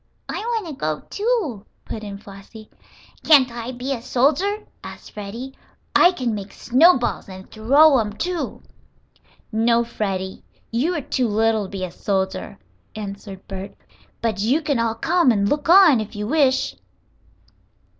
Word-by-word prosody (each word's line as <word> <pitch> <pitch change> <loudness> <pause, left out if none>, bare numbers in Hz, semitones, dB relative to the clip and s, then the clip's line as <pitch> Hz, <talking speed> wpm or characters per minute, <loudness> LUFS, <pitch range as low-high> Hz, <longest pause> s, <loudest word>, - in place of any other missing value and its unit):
"I - - -4
want 455 -2 -2
to 320 - -6
go, 155 - -3
too," 405 - -1 0.2
put 215 - -6
in 200 -1 -6
Flossie. 200 +2 -13 0.5
"Can't 275 -5 +6
I 235 +1 -5
be 255 +2 -3
a 240 - -5
soldier?" 310 - +1 0.2
asked - - -10
Freddie. 225 +6 -7 0.4
"I 355 - +7
can 250 -10 -2
make 200 -1 -6
snowballs, 260 - +3
and 190 0 -11
throw 275 +6 +5
'em, 210 -2 -2
too." 350 +9 -4 0.9
"No, 230 +1 +2
Freddie, 190 -5 -4 0.3
you 285 +10 0
are 300 - -2
too 255 -1 -1
little 220 0 +1
to - - -9
be 195 -2 -5
a 180 - -4
soldier," 195 +1 -2 0.4
answered 200 -2 -8
Bert. 195 0 -7 0.5
"But 220 -3 0
you 260 +9 +2
can 285 -5 0
all 230 -1 0
come 340 +4 +3
and 200 -3 +1
look 295 +7 -1
on, 345 - +7
if 215 +1 -6
you 210 0 -3
wish." 265 0 +2
230 Hz, 155 wpm, -22 LUFS, 205-290 Hz, 0.9 s, I